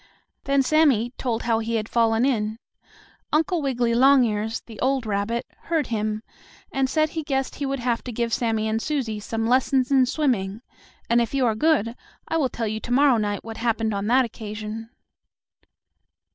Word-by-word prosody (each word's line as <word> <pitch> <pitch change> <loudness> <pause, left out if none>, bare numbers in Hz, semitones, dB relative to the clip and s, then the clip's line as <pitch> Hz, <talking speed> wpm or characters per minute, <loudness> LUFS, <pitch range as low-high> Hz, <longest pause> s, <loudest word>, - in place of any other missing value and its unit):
Then 275 0 +3
Sammie 260 -5 +3
told 235 -3 -2
how 230 -1 +1
he 230 +1 -2
had 215 -1 -1
fallen 230 0 +2
in. 215 -5 0 0.7
Uncle 320 +2 +1
Wiggily 245 -4 0
Longears, 235 -4 +3
the 225 -3 -13
old 265 -1 +1
rabbit, 215 +3 -1 0.2
heard 325 -4 0
him, 215 0 -2 0.5
and 270 -1 0
said 310 +1 +2
he 320 - -4
guessed 270 -3 -2
he 280 - -2
would 275 0 -2
have 235 -1 -1
to 250 - -4
give 235 0 -2
Sammie 225 -2 0
and 220 +1 -1
Susie 250 -8 -2
some 225 +2 -3
lessons 255 +2 +2
in 260 -2 +5
swimming, 235 -7 -1 0.4
and 235 +1 +3
if 235 +3 -2
you 265 -2 +2
are 225 - +2
good, 235 -2 +1 0.3
I 325 - 0
will 280 -5 +1
tell 230 -1 -3
you 215 +1 -3
to 240 - -7
morrow 270 -1 +5
night 205 -2 -2
what 225 -1 -7
happened 225 -2 0
on 200 +1 -2
that 255 +2 +4
occasion. 220 0 -7
235 Hz, 180 wpm, -24 LUFS, 220-270 Hz, 0.7 s, in